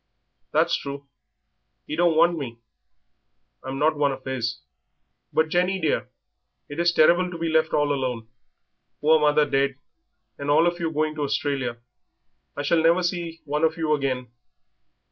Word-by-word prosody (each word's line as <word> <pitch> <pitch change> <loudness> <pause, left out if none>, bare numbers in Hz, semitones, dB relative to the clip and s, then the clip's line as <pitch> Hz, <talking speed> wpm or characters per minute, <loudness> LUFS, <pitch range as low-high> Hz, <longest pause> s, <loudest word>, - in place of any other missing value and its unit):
"That's - - +2
true. 140 0 -6 0.8
He 150 - -4
don't 170 0 +3
want 170 +1 +5
me; 130 -7 -6 1.1
I'm 135 +1 -5
not 155 +2 +2
one 145 -1 +2
of 135 -1 -7
his. 125 -3 -3 0.7
But, 160 0 +1
Jenny, 180 +3 +1
dear, 160 -4 -1 0.6
it 145 +3 -7
is 170 0 +3
terrible 175 +3 +4
to 175 - -7
be 165 0 -2
left 160 0 +2
all 145 -1 +2
alone. 125 -5 -3 0.7
Poor 155 +1 +4
mother 150 0 +3
dead, 135 -1 +1 0.6
and 140 0 -4
all 155 +3 +5
of 175 0 0
you 165 -1 -1
going 155 0 0
to - - -3
Australia. 135 -3 -2 0.8
I 145 - -2
shall 160 +3 +2
never 170 +3 +3
see 170 -2 -3
one 150 +2 -2
of 160 +1 +2
you 160 -2 +1
again." 130 -4 -2
150 Hz, 160 wpm, -24 LUFS, 140-165 Hz, 1.1 s, want